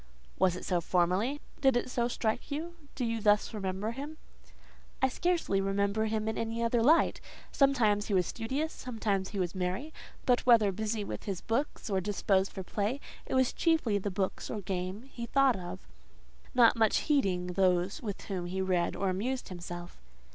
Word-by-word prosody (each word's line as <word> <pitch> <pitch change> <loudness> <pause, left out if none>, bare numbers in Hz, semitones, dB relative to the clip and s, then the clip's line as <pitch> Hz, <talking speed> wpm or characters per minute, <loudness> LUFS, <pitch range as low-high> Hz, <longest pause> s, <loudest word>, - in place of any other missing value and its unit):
"Was 185 -2 +3
it 180 - -7
so 180 -3 +1
formerly? 185 - +1 0.2
Did 265 -3 +4
it 240 - -1
so 240 -1 0
strike 230 +1 -2
you? 315 +4 -4 0.2
Do 250 - -1
you 230 -1 -1
thus 210 +2 +3
remember 195 +1 -2
him?" 285 +5 -7 0.8
"I 265 - +3
scarcely 325 - +1
remember 200 +2 +1
him 220 0 -1
in 220 - -1
any 230 +1 -2
other 230 0 +2
light. 310 +8 +4 0.3
Sometimes 225 -7 +3
he 205 - +1
was 180 -1 +3
studious; 270 - -2
sometimes 210 -6 -2
he 205 - -6
was 180 -3 -1
merry: 190 +12 -3 0.3
but 245 -1 +3
whether 225 -5 +5
busy 215 +2 -2
with - - -6
his 195 -4 -3
books 245 +6 -2
or 195 -3 0
disposed 195 0 +1
for 190 - -6
play, 210 +8 -2 0.3
it - - -2
was 260 -1 +3
chiefly 315 - +2
the 205 - -2
books 190 0 -2
or 210 - -3
game 185 +3 -3
he 240 -3 -7
thought 275 -2 +4
of; 175 - -7 0.7
not 240 -2 +6
much 220 -2 +3
heeding 185 -12 +1
those 185 - +2
with 205 -5 -5
whom 185 -4 -4
he 185 +2 -3
read 185 -2 +1
or 195 - -1
amused 235 +8 -2
himself." 175 -1 -8
210 Hz, 180 wpm, -31 LUFS, 190-245 Hz, 0.8 s, not